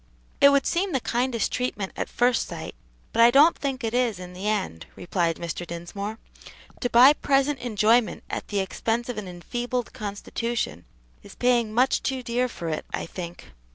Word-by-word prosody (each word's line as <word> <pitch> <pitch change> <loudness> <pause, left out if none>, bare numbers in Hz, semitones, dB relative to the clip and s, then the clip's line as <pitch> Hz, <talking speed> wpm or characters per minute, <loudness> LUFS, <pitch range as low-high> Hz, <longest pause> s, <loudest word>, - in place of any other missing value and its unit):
"It 280 - +9
would 280 -1 +3
seem 370 +2 0
the 265 - +2
kindest 240 0 -1
treatment 230 -6 -2
at - - -3
first 245 -1 +2
sight, 165 -2 -7 0.4
but 230 - +3
I 235 - +9
don't 290 +7 +6
think 270 -3 -3
it 225 0 -2
is 245 -5 +1
in 180 0 -9
the 190 +3 -5
end," 190 - -2
replied 170 -2 -1
Mr. 170 +1 -5
Dinsmore. 175 +5 -6 0.6
"To 245 - -1
buy 250 +5 +8
present 275 -1 +1
enjoyment 225 0 +2
at - - -5
the 205 -2 0
expense 225 +5 -2
of 240 - -3
an 200 - -7
enfeebled 240 +7 -4
constitution 205 - -4 0.4
is - - -13
paying 240 -3 +2
much 250 +4 +2
too 265 -1 -2
dear 245 +1 0
for 170 -8 -7
it, 155 - -2
I - - -3
think." 170 - -8
230 Hz, 180 wpm, -25 LUFS, 190-250 Hz, 0.6 s, It